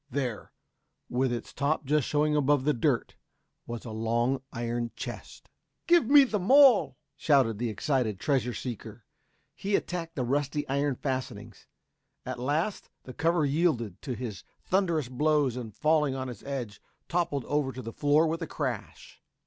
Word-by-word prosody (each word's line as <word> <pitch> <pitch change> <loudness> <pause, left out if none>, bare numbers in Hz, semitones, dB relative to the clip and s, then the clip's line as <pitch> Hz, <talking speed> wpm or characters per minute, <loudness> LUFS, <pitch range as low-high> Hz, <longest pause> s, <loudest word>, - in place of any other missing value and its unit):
There, 125 -7 -3 0.6
with 125 +1 +1
it's 120 - -5
top 145 +2 0
just 150 0 +1
showing 150 0 +1
above 145 -2 +3
the 150 +2 +2
dirt 115 - 0 0.5
was 120 0 -6
a 115 - -6
long 120 +4 0
iron 120 0 -2
chest. - - -8 0.4
"Give 340 -8 +4
me 285 +1 +8
the 220 -6 -1
maul!" 255 - +6 0.2
shouted 130 -8 +2
the 120 -1 -1
excited 110 -2 -1
treasure 125 -3 0
seeker. 115 -2 -7 0.5
He 200 +1 -1
attacked 165 -1 -3
the 130 - -1
rusty 145 +3 -1
iron 140 0 0
fastenings; 130 0 -5 0.6
at - - -5
last 150 +10 -1
the 130 - -9
cover 165 +2 +1
yielded 140 - 0
to 130 -4 -4
his 115 -4 -6 0.2
thunderous 170 -7 +1
blows 145 0 +1
and 120 -3 -6
falling 150 +2 +2
on 130 -1 -4
its 120 -5 -9
edge, 125 -7 -5 0.3
toppled 170 -7 -1
over 145 -2 0
to 130 0 -8
the 115 - -7
floor 145 +2 +3
with 165 +2 -2
a 165 - -3
crash. 130 -9 -5
140 Hz, 155 wpm, -28 LUFS, 120-155 Hz, 0.6 s, me